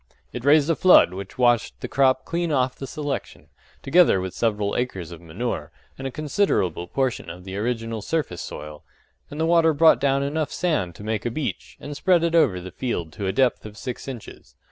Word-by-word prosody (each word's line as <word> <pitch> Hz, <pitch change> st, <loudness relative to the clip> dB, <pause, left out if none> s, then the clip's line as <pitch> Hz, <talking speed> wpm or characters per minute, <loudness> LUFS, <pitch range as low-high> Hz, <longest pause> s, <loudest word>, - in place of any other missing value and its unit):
It 125 Hz, -, -5 dB
raised 145 Hz, +1 st, +5 dB
a 165 Hz, -, +2 dB
flood 180 Hz, -, +6 dB
which 95 Hz, +1 st, -8 dB
washed 120 Hz, -2 st, +2 dB
the -, -, -5 dB
crop 130 Hz, -1 st, +2 dB
clean 170 Hz, -1 st, -1 dB
off 130 Hz, -3 st, +1 dB
the 135 Hz, -, -7 dB
selection, 145 Hz, +1 st, -5 dB, 0.3 s
together 165 Hz, -, +5 dB
with 95 Hz, -1 st, -4 dB
several 105 Hz, -3 st, 0 dB
acres 95 Hz, -10 st, -3 dB
of 85 Hz, -, -10 dB
manure, 85 Hz, -3 st, -4 dB, 0.2 s
and 135 Hz, -, -5 dB
a -, -, -3 dB
considerable 135 Hz, -, 0 dB
portion 130 Hz, +3 st, -2 dB
of 90 Hz, +2 st, -9 dB
the 95 Hz, 0 st, -7 dB
original 115 Hz, 0 st, -2 dB
surface 145 Hz, -, -2 dB
soil; 75 Hz, 0 st, -8 dB, 0.5 s
and 145 Hz, -, -8 dB
the 160 Hz, -, +2 dB
water 165 Hz, -2 st, +4 dB
brought 160 Hz, +2 st, +6 dB
down 140 Hz, 0 st, +2 dB
enough 150 Hz, +2 st, -2 dB
sand 150 Hz, -, -1 dB
to -, -, -11 dB
make 110 Hz, 0 st, -2 dB
a -, -, -1 dB
beach, 140 Hz, +5 st, -5 dB
and 145 Hz, 0 st, -7 dB
spread 175 Hz, +2 st, +3 dB
it 170 Hz, 0 st, +1 dB
over 145 Hz, -, +3 dB
the 90 Hz, +1 st, -8 dB
field 85 Hz, -11 st, -3 dB
to 100 Hz, +2 st, -4 dB
a -, -, +1 dB
depth 125 Hz, +5 st, +1 dB
of 105 Hz, 0 st, -10 dB
six 125 Hz, +2 st, -6 dB
inches. 125 Hz, -5 st, -9 dB
125 Hz, 205 wpm, -24 LUFS, 95-150 Hz, 0.5 s, flood